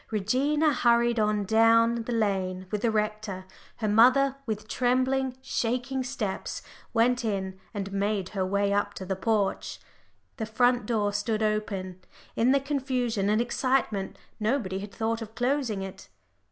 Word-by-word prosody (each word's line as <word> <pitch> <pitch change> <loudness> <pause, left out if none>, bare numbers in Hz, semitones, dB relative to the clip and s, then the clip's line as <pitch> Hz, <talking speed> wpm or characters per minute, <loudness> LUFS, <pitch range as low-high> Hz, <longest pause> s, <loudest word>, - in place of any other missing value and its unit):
Regina 275 +9 +1
hurried 235 -1 +3
on 210 -1 +1
down 225 +2 +5
the 245 - -4
lane 190 -5 -1
with 210 -1 -2
the 235 - +2
rector, 215 -3 -2 0.3
her 220 - -2
mother 255 +6 +5
with 215 -1 -3
trembling, 255 +2 +1
shaking 255 +1 -1
steps, 235 -7 -4 0.3
went 245 +1 +2
in 190 -3 -2
and 200 -3 -5
made 200 -1 -1
her 195 -3 -2
way 200 +1 +1
up 205 - 0
to 190 - -6
the 190 +1 -2
porch. 205 0 -1 0.6
The 220 -3 -3
front 245 0 +2
door 210 -3 0
stood 215 +1 -1
open; 195 -4 -2 0.3
in 240 +3 +3
the 275 - +4
confusion 255 -7 -1
and 215 +1 +3
excitement 240 -5 0 0.2
nobody 215 -4 0
had 200 +1 -7
thought 225 +1 -2
of 220 0 -8
closing 245 -5 0
it. 195 0 -9
220 Hz, 150 wpm, -27 LUFS, 200-245 Hz, 0.6 s, down